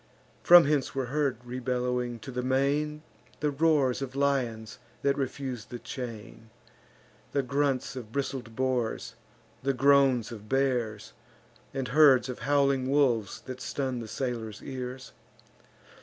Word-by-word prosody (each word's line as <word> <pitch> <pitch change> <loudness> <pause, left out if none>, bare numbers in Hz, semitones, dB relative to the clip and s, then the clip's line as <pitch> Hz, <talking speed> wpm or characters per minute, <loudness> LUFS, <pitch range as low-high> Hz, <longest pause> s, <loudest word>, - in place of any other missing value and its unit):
From 175 -2 +8
hence 145 -2 0
were 135 -1 -1
heard, 145 -5 +1
rebellowing 125 -1 -2
to 135 - -7
the 125 0 -2
main, 140 +4 0 0.4
The 150 -1 0
roars 140 -3 +2
of 135 -1 -5
lions 125 -6 -1 0.2
that 140 0 +3
refuse 135 -3 -4
the 120 - -7
chain, 115 -3 -8 0.8
The 140 - +1
grunts 140 -1 0
of 120 -4 -8
bristled 130 -3 -4
boars, 130 -3 -1 0.5
and 135 -1 0
groans 135 -4 +4
of 105 -2 -10
bears, 120 - 0 0.6
And 135 -1 -3
herds 135 -3 +6
of 125 - -5
howling 140 -2 +2
wolves 125 -8 +1
that 130 -1 -8
stun 130 -3 -2
the 115 - -6
sailors' 110 -3 -4
ears. 130 -1 -6
130 Hz, 130 wpm, -28 LUFS, 120-140 Hz, 0.8 s, From